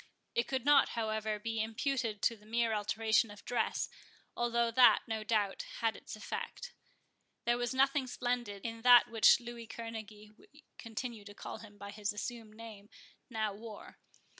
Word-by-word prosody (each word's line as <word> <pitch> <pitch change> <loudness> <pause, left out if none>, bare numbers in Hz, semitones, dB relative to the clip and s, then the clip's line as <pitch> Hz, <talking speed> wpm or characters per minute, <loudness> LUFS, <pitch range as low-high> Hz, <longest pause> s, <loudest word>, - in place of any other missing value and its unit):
It 235 0 +1
could 265 -2 -2
not, 290 -1 +6
however, 220 -1 -1
be 225 +1 -2
imputed 225 -1 -2
to 230 - +3
the 210 -1 -20
mere 230 0 +1
alteration 220 +1 +2
of 205 0 -12
dress, 245 - 0 0.5
although 235 -1 +1
that, 245 +1 +6
no 220 -1 -2
doubt, 210 -3 0 0.2
had 225 -3 +1
its - - -9
effect. 485 - -6 0.7
There 240 0 +2
was 245 -1 -1
nothing 270 0 +2
splendid 240 -5 -3
in 230 0 -4
that 245 0 +7
which 225 -3 +6
Louis 235 -1 -8
Kerneguy 215 -2 -8
(we 295 +1 -20 0.2
continue 230 -1 -5
to 205 0 -11
call - - -7
him 210 -2 -13
by 200 0 -8
his 210 0 -2
assumed 220 0 -6
name) 220 -2 -11 0.4
now 220 -3 -1
wore. 215 +1 -10
225 Hz, 165 wpm, -33 LUFS, 215-240 Hz, 0.7 s, that